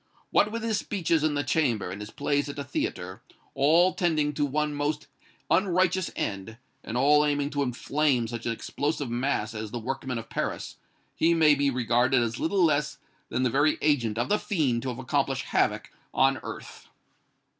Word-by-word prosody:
What 210 Hz, -, +3 dB
with 230 Hz, 0 st, -4 dB
his 220 Hz, -2 st, 0 dB
speeches 165 Hz, -6 st, 0 dB
in 155 Hz, -1 st, +1 dB
the 145 Hz, -, 0 dB
Chamber 125 Hz, -, 0 dB
and 100 Hz, +2 st, -7 dB
his 105 Hz, -, -7 dB
plays 145 Hz, +1 st, -1 dB
at 145 Hz, -, -6 dB
the 140 Hz, -, -4 dB
theatre, 95 Hz, -9 st, -4 dB, 0.3 s
all 165 Hz, +7 st, +4 dB
tending 155 Hz, -4 st, +1 dB
to 145 Hz, 0 st, 0 dB
one 150 Hz, +2 st, -1 dB
most 145 Hz, +1 st, -2 dB, 0.5 s
unrighteous 185 Hz, 0 st, +2 dB
end, 100 Hz, +3 st, -4 dB, 0.3 s
and 115 Hz, -, -4 dB
all 150 Hz, +3 st, +5 dB
aiming 145 Hz, -1 st, 0 dB
to 145 Hz, -, -1 dB
inflame 135 Hz, 0 st, 0 dB
such 120 Hz, 0 st, -5 dB
an -, -, +1 dB
explosive 145 Hz, +3 st, -3 dB
mass 120 Hz, -3 st, -1 dB
as 110 Hz, -1 st, -5 dB
the 120 Hz, -, -5 dB
workmen 130 Hz, +1 st, -4 dB
of 115 Hz, -1 st, -6 dB
Paris, -, -, -4 dB, 0.4 s
he 170 Hz, +1 st, +3 dB
may 155 Hz, -2 st, +6 dB
be 140 Hz, 0 st, +2 dB
regarded 125 Hz, 0 st, +2 dB
as 115 Hz, -1 st, -1 dB
little 185 Hz, +3 st, +1 dB
less 150 Hz, -1 st, 0 dB, 0.3 s
than 130 Hz, -, -1 dB
the 125 Hz, -, +1 dB
very 145 Hz, +4 st, +3 dB
agent 120 Hz, -8 st, +1 dB
of 120 Hz, -, 0 dB
the 210 Hz, -, +2 dB
fiend 140 Hz, -, 0 dB
to 130 Hz, -, -3 dB
accomplish 130 Hz, +2 st, -1 dB
havoc -, -, 0 dB, 0.2 s
on -, -, +3 dB
earth!" -, -, -9 dB
140 Hz, 180 wpm, -27 LUFS, 120-155 Hz, 0.5 s, may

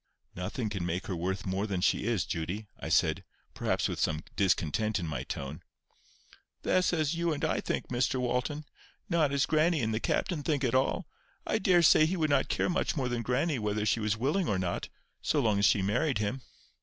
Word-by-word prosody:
"Nothing 105 Hz, +6 st, -3 dB
can 100 Hz, -4 st, -3 dB
make 90 Hz, +2 st, -2 dB
her 95 Hz, -, -3 dB
worth 95 Hz, +3 st, -2 dB
more 95 Hz, +2 st, -1 dB
than 95 Hz, -3 st, -2 dB
she 95 Hz, -, +1 dB
is, 115 Hz, -5 st, +1 dB
Judy," 90 Hz, +6 st, -3 dB
I -, -, -5 dB
said, -, -, +2 dB, 0.3 s
perhaps -, -, 0 dB
with -, -, -4 dB
some 80 Hz, +1 st, 0 dB
discontent 100 Hz, +3 st, +1 dB
in 90 Hz, -, -3 dB
my 75 Hz, -5 st, -3 dB
tone. 70 Hz, +4 st, -6 dB, 1.0 s
"That's 185 Hz, 0 st, +2 dB
as 155 Hz, -3 st, +1 dB
you 170 Hz, 0 st, 0 dB
and 155 Hz, +1 st, -1 dB
I 160 Hz, -, 0 dB
think, -, -, -3 dB
Mr 125 Hz, +2 st, +1 dB
Walton; 125 Hz, +5 st, -1 dB, 0.4 s
not 165 Hz, -5 st, +2 dB
as 140 Hz, -1 st, +2 dB
grannie 155 Hz, 0 st, +2 dB
and 110 Hz, -1 st, 0 dB
the 110 Hz, -, 0 dB
captain 165 Hz, +6 st, -1 dB
think 145 Hz, -2 st, 0 dB
at 120 Hz, -, +1 dB
all. 130 Hz, +1 st, +1 dB, 0.4 s
I -, -, 0 dB
daresay 175 Hz, -4 st, +5 dB
he 185 Hz, +3 st, -1 dB
would 155 Hz, -3 st, +1 dB
not 140 Hz, -1 st, +2 dB
care -, -, +1 dB
much 180 Hz, -, 0 dB
more 130 Hz, -3 st, 0 dB
than 120 Hz, -1 st, -1 dB
grannie 130 Hz, +4 st, 0 dB
whether 105 Hz, 0 st, -1 dB
she 110 Hz, +2 st, +2 dB
was 105 Hz, 0 st, 0 dB
willing 150 Hz, -, 0 dB
or 100 Hz, -, +1 dB
not, 90 Hz, -2 st, -2 dB, 0.3 s
so 150 Hz, -, +1 dB
long 110 Hz, -6 st, +2 dB
as 100 Hz, -, +4 dB
she 100 Hz, -, +4 dB
married 125 Hz, +8 st, +1 dB
him." 105 Hz, +5 st, -2 dB
120 Hz, 205 wpm, -30 LUFS, 95-150 Hz, 1.0 s, daresay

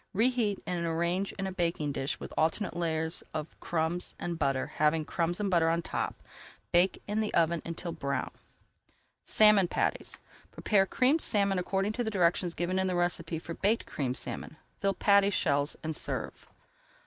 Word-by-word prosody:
Reheat 225 Hz, -2 st, +1 dB
and 175 Hz, -1 st, -2 dB
arrange 170 Hz, +4 st, 0 dB
in 195 Hz, -, -4 dB
a 190 Hz, -, -3 dB
baking 170 Hz, -5 st, -1 dB
dish 135 Hz, 0 st, -3 dB
with -, -, -8 dB
alternate 165 Hz, +5 st, 0 dB
layers 160 Hz, -1 st, 0 dB
of 155 Hz, 0 st, -5 dB
crumbs 170 Hz, +1 st, -2 dB
and 170 Hz, -1 st, -4 dB
butter, 135 Hz, -3 st, +1 dB
having 155 Hz, +1 st, +2 dB
crumbs 170 Hz, +3 st, -1 dB
and 200 Hz, -2 st, -1 dB
butter 165 Hz, -2 st, +4 dB
on 165 Hz, +1 st, 0 dB
top. -, -, -3 dB, 0.5 s
Bake 175 Hz, +2 st, +3 dB
in 210 Hz, +1 st, -1 dB
the 215 Hz, -1 st, 0 dB
oven 170 Hz, 0 st, +2 dB
until 170 Hz, +1 st, -5 dB
brown. 140 Hz, -4 st, -3 dB, 0.9 s
SALMON 210 Hz, -3 st, +6 dB
PATTIES -, -, -1 dB, 0.3 s
Prepare 195 Hz, -3 st, +2 dB
Creamed 270 Hz, +9 st, +3 dB
Salmon 200 Hz, -3 st, +1 dB
according 195 Hz, +3 st, 0 dB
to 245 Hz, -, -1 dB
directions 180 Hz, -4 st, +1 dB
given 180 Hz, +2 st, -1 dB
in 190 Hz, -, +1 dB
the 180 Hz, -, -1 dB
recipe 175 Hz, -1 st, 0 dB
for 170 Hz, +1 st, -6 dB
Baked 210 Hz, +6 st, +1 dB
Creamed 130 Hz, -2 st, -2 dB
Salmon. 155 Hz, -, -4 dB, 0.2 s
Fill 195 Hz, 0 st, +1 dB
patty 200 Hz, -1 st, +4 dB
shells 145 Hz, -6 st, +1 dB
and 160 Hz, 0 st, -2 dB
serve. -, -, -4 dB
175 Hz, 165 wpm, -30 LUFS, 160-195 Hz, 0.9 s, SALMON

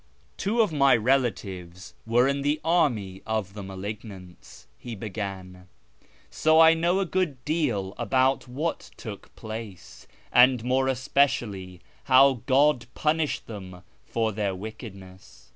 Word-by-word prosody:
Two 225 Hz, +4 st, +1 dB
of 210 Hz, -7 st, +1 dB
my 140 Hz, -3 st, +5 dB
relatives 105 Hz, -8 st, -1 dB
were 120 Hz, +3 st, +4 dB
in 140 Hz, 0 st, 0 dB
the 145 Hz, +2 st, 0 dB
army 120 Hz, -, +1 dB
of 110 Hz, -4 st, -2 dB
the 105 Hz, -, -7 dB
malignants," 95 Hz, -, -9 dB
he 120 Hz, -, -7 dB
began, 95 Hz, -3 st, -7 dB, 0.3 s
" -, -, -31 dB, 0.3 s
so 155 Hz, -, +3 dB
I 165 Hz, 0 st, +8 dB
know 170 Hz, +3 st, +1 dB
a 195 Hz, -, 0 dB
good 165 Hz, -8 st, -2 dB
deal 120 Hz, -, -1 dB
about 130 Hz, +4 st, +1 dB
what 140 Hz, -, -4 dB
took -, -, -9 dB
place, 110 Hz, -4 st, -9 dB, 0.3 s
and 125 Hz, -1 st, +5 dB
more 130 Hz, +2 st, +1 dB
especially 120 Hz, -9 st, 0 dB, 0.2 s
how 130 Hz, -1 st, +5 dB
God 135 Hz, -2 st, +3 dB
punished 155 Hz, 0 st, 0 dB
them 95 Hz, -5 st, -9 dB, 0.2 s
for 115 Hz, -1 st, -1 dB
their 100 Hz, -2 st, -2 dB
wickedness. 95 Hz, -2 st, -11 dB
115 Hz, 130 wpm, -26 LUFS, 95-140 Hz, 0.3 s, I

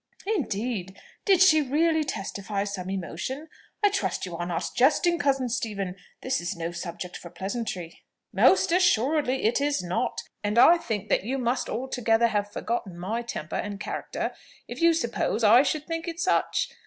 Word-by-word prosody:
"Indeed! 225 Hz, -, -2 dB, 0.3 s
Did 380 Hz, -3 st, +6 dB
she 315 Hz, -5 st, +6 dB
really 315 Hz, +3 st, +2 dB
testify 200 Hz, -5 st, -3 dB
some 195 Hz, -3 st, -5 dB
emotion? 195 Hz, -, -4 dB, 0.3 s
I 410 Hz, -, +5 dB
trust 385 Hz, -, -1 dB
you 175 Hz, -2 st, -6 dB
are 175 Hz, +1 st, -3 dB
not 170 Hz, -2 st, -2 dB
jesting, 315 Hz, +6 st, +3 dB
cousin 270 Hz, -3 st, +1 dB
Stephen; 210 Hz, -6 st, -3 dB, 0.3 s
this 260 Hz, 0 st, -1 dB
is 175 Hz, +3 st, -3 dB
no 170 Hz, 0 st, -4 dB
subject 175 Hz, +1 st, -6 dB
for 170 Hz, -, -9 dB
pleasantry." 190 Hz, -2 st, -5 dB, 0.3 s
"Most -, -, +4 dB
assuredly 290 Hz, -5 st, +2 dB
it 235 Hz, +5 st, +2 dB
is 285 Hz, -9 st, 0 dB
not! 185 Hz, +8 st, -2 dB, 0.2 s
and 210 Hz, +2 st, -1 dB
I 335 Hz, +8 st, +7 dB
think 215 Hz, -, -4 dB
that -, -, +2 dB
you 260 Hz, +6 st, -2 dB
must 250 Hz, 0 st, -1 dB
altogether 235 Hz, -2 st, +1 dB
have 205 Hz, -1 st, -1 dB
forgotten 205 Hz, -5 st, -3 dB
my 210 Hz, +7 st, -2 dB
temper 200 Hz, -9 st, -5 dB
and 205 Hz, -1 st, -4 dB
character, -, -, -4 dB, 0.3 s
if -, -, -7 dB
you 335 Hz, 0 st, +5 dB
suppose 235 Hz, -5 st, -1 dB
that 210 Hz, -, +6 dB
I 245 Hz, -, +9 dB
should 300 Hz, +2 st, -1 dB
think 330 Hz, 0 st, -4 dB
it 335 Hz, 0 st, -5 dB
such. 370 Hz, +3 st, +1 dB
235 Hz, 170 wpm, -26 LUFS, 195-290 Hz, 0.3 s, I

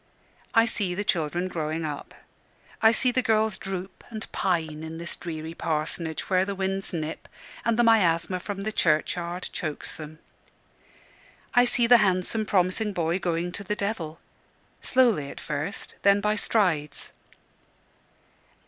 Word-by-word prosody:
I 225 Hz, 0 st, +7 dB
see 200 Hz, -5 st, -1 dB
the 205 Hz, -, -1 dB
children 175 Hz, -1 st, 0 dB
growing 160 Hz, -2 st, -2 dB
up. 150 Hz, -2 st, -6 dB, 0.7 s
I 220 Hz, -, +7 dB
see 250 Hz, +2 st, +2 dB
the 255 Hz, -, +2 dB
girls 220 Hz, -2 st, +2 dB
droop 190 Hz, -1 st, -6 dB
and 220 Hz, -2 st, -6 dB
pine 160 Hz, -5 st, 0 dB
in 160 Hz, 0 st, -6 dB
this 170 Hz, +1 st, -4 dB
dreary 160 Hz, -1 st, -6 dB
parsonage, 160 Hz, 0 st, -2 dB
where 185 Hz, -1 st, +3 dB
the 200 Hz, +1 st, -3 dB
winds 195 Hz, 0 st, -1 dB
nip, 160 Hz, -3 st, -4 dB, 0.4 s
and 230 Hz, -1 st, +1 dB
the 240 Hz, -, +5 dB
miasma 185 Hz, -5 st, +3 dB
from 195 Hz, +1 st, -5 dB
the 215 Hz, -, -1 dB
churchyard 175 Hz, +1 st, 0 dB
chokes 155 Hz, -3 st, -4 dB
them. 155 Hz, 0 st, -9 dB, 1.4 s
I 245 Hz, 0 st, +6 dB
see 240 Hz, 0 st, +3 dB
the 245 Hz, +1 st, +8 dB
handsome 200 Hz, +1 st, +1 dB
promising 195 Hz, +3 st, +1 dB
boy 170 Hz, 0 st, 0 dB
going 175 Hz, -1 st, -1 dB
to 200 Hz, -, -5 dB
the 210 Hz, +2 st, -2 dB
devil 180 Hz, -7 st, -3 dB, 0.6 s
slowly 235 Hz, -, +3 dB
at -, -, -8 dB
first, 155 Hz, +8 st, -4 dB
then 200 Hz, 0 st, +5 dB
by 210 Hz, +1 st, +1 dB
strides. 180 Hz, -9 st, +1 dB
185 Hz, 145 wpm, -26 LUFS, 165-210 Hz, 1.4 s, the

